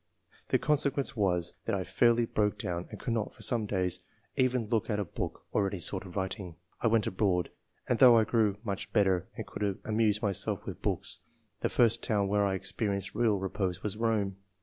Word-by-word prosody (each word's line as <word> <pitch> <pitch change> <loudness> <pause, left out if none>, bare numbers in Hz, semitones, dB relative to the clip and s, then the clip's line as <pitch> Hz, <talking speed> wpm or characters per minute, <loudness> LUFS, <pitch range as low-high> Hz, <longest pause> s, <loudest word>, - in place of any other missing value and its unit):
The - - +4
consequence 140 -3 +1
was, 90 -5 +1
that 115 - 0
I 95 - -1
fairly 120 +6 +3
broke 105 -2 0
down, 85 0 -3
and - - -9
could 120 - -2
not, 110 -2 -2
for 110 - -6
some 110 0 +1
days, 95 -3 +1 0.4
even 130 -2 +2
look 115 0 0
at 105 -2 0
a 100 - -1
book - - -5
or 100 - +2
any 95 - -3
sort 95 +2 -2
of 90 - -12
writing. 95 -2 -3 0.3
I - - +3
went 115 -2 +3
abroad; 95 -2 0 0.4
and 120 - +1
though 125 -3 +9
I 110 - +5
grew 110 -2 +2
much 100 -3 -4
better 95 -5 +3
and - - -4
could 100 -2 -2
amuse 110 -1 +2
myself 100 -1 0
with - - -7
books, - - -1 0.4
the - - 0
first 115 -1 +3
town 100 -3 +1
where 105 0 +3
I 95 - 0
ex 95 +1 -5
perienced 100 -2 -2
real 110 -2 +2
repose 95 -1 -2
was 105 -1 -2
Rome. 105 -4 0
105 Hz, 205 wpm, -30 LUFS, 95-115 Hz, 0.4 s, though